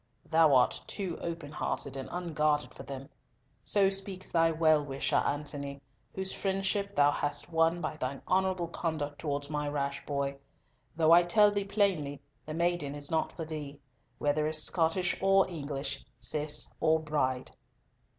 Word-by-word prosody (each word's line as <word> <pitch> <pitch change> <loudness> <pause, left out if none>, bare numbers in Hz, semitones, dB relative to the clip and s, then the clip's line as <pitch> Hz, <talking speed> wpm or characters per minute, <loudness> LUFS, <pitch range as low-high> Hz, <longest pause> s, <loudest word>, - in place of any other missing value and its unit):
Thou 160 -3 +6
art 125 - +3
too 190 -5 -4
open 165 -4 -5
hearted 140 -2 -3
and 135 - -5
unguarded 155 -4 0
for - - -10
them! 135 -1 -7 0.6
So 195 -2 +3
speaks 195 -1 -4
thy 165 -1 +4
well 155 -2 +4
wisher, 135 -1 0
Antony, 140 -1 -2 0.4
whose 190 0 -3
friendship 195 +1 -1
thou 145 0 +5
hast 145 +2 -2
won 165 +1 +2
by 155 -1 -3
thine 135 -1 -4
honourable 185 -1 +1
conduct 155 -4 -3
towards 145 -2 -2
my 150 -1 -1
rash 140 -1 -2
boy; 140 -1 -1 0.6
though 160 0 +4
I 170 +1 +9
tell 205 +4 +5
thee 200 -1 -1
plainly, 190 -9 0 0.3
the 155 - -4
maiden 170 -4 0
is 145 +1 -5
not 160 -1 +1
for 165 - -5
thee, 150 -2 -6 0.4
whether 150 +1 +1
as 155 0 +2
Scottish 175 +1 +1
or 195 0 +5
English, 140 -5 -4 0.2
Cis 150 +5 0
or 160 0 +3
Bride." 140 -5 -1
155 Hz, 155 wpm, -31 LUFS, 145-175 Hz, 0.6 s, I